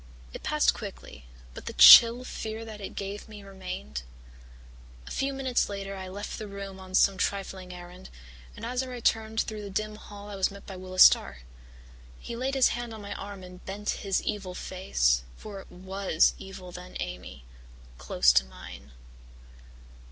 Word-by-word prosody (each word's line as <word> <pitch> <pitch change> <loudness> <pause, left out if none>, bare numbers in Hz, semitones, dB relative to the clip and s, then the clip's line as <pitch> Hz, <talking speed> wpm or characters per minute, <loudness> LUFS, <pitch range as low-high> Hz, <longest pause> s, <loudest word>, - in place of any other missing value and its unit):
It - - -7
passed - - +2
quickly, - - -9 0.3
but - - -10
the - - -4
chill 230 - +10
fear 220 -2 -5
that 215 -2 -9
it 195 - -7
gave 200 +2 -6
me 210 -2 -10
remained. 180 - -6 1.0
A - - -10
few 275 +1 -1
minutes 265 -4 0
later 195 -1 -5
I 190 -1 -7
left 200 +3 -6
the 215 - -6
room 200 -1 -8
on 185 0 -7
some 195 0 +4
trifling 190 -2 -3
errand, 180 +1 -11 0.5
and 225 - -7
as 250 +2 -1
I 260 - -5
returned 225 -3 0
through 215 -2 -5
the 205 - -7
dim 215 +2 -3
hall 205 -1 -11
I 205 - -7
was 190 -1 +1
met 200 -1 -12
by 195 - -8
Willis 185 0 +4
Starr. 65 -3 +5 0.8
He 235 - -7
laid 260 +3 -2
his 265 - +5
hand 240 -2 -4
on 215 - -9
my 200 0 -5
arm 200 -1 -8
and 180 0 -12
bent 205 +2 -3
his 195 -2 0
evil 195 -4 -3
face 65 - +1 0.2
for 205 -2 -8
it - - -14
was 190 -2 +1
evil 190 -2 -9
then, 180 +1 -9
Amy - - -7 0.5
close 60 0 +4
to 65 0 +5
mine. 65 +1 -12
195 Hz, 175 wpm, -28 LUFS, 180-215 Hz, 1.0 s, chill